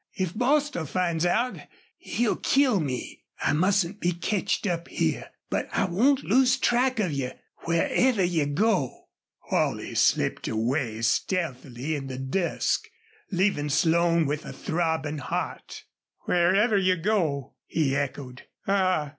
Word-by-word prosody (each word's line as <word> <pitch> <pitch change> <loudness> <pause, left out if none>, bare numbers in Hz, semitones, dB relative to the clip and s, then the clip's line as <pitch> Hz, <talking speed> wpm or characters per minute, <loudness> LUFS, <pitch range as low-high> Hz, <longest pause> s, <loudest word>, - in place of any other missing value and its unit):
If 185 -3 -2
Bostil 260 - +1
finds 175 0 0
out 235 +8 0 0.4
he'll 235 -2 -1
kill 260 -7 +3
me. 135 -6 -4 0.2
I - - +1
mustn't 190 +4 +1
be 175 -2 0
ketched 190 +4 -1
up 170 -3 -2
here. - - -1 0.2
But - - -1
I - - +1
won't 250 +10 +2
lose 255 +4 +3
track 250 0 +2
of 185 -6 +1
you 135 -3 -3 0.3
wherever 195 +7 +2
you 170 -5 +1
go." 175 - 0 0.4
Holley - - 0
slipped - - +1
away 115 0 -1
stealthily 135 - -1
in 135 -2 -5
the 130 -1 -6
dusk, 140 +7 -1 0.4
leaving 180 -6 +1
Slone 165 +2 +3
with 150 +2 -2
a - - -8
throbbing 160 -2 -1
heart. - - -5 0.4
"Wherever 195 +5 +3
you 185 -1 +3
go!" 165 - -1
he 140 -4 0
echoed. 135 -2 -4 0.2
"Ah! 185 -6 +1
170 Hz, 130 wpm, -26 LUFS, 145-200 Hz, 0.4 s, kill